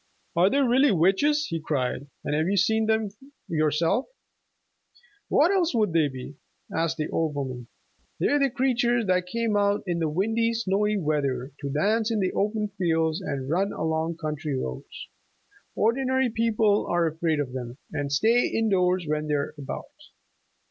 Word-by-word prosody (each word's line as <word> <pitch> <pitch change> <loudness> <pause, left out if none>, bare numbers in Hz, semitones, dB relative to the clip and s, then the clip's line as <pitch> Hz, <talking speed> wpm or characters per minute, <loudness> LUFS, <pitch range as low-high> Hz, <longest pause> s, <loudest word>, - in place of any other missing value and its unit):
"Are 175 +3 +5
they 275 - +1
really 265 +2 +4
witches?" 200 - +3
he 165 - -3
cried. 140 -3 -2 0.2
"And 145 - -2
have 155 +2 +1
you 200 +1 +1
seen 220 +2 +2
them 220 -1 +1 0.4
yourself?" 165 - +1 1.2
"What 320 +6 +4
else 350 -8 +1
would 210 -6 +1
they 160 -3 +3
be?" 130 +1 -8 0.4
asked 165 0 0
the 155 - -1
old 160 -2 -1
woman. 130 -4 -4 0.5
"They're 290 - +2
the 275 -1 +3
creatures 245 -2 +1
that 185 -1 +1
come 230 -2 0
out 205 0 +2
in 175 -2 -1 0.2
windy, 225 +4 +1
snowy 210 -1 +1
weather, 140 -6 -1
to 140 - -4
dance 210 +10 +1
in 225 -2 0
the 185 -2 +1
open 210 +1 0
fields 160 -3 +1
and 135 -2 -4
run 185 +7 0
along 160 +1 -1
country 150 -3 -3
roads. 65 - -6 0.7
Ordinary 260 +2 +1
people 220 -2 +2
are 175 -1 +2
afraid 160 -1 0
of 130 -3 -3
them 125 -1 -6 0.2
and 145 -1 -2
stay 225 +12 +3
indoors 185 -5 +1
when 150 0 -1
they're 145 -1 -1
about. 140 -3 -6
180 Hz, 155 wpm, -26 LUFS, 150-225 Hz, 1.2 s, Are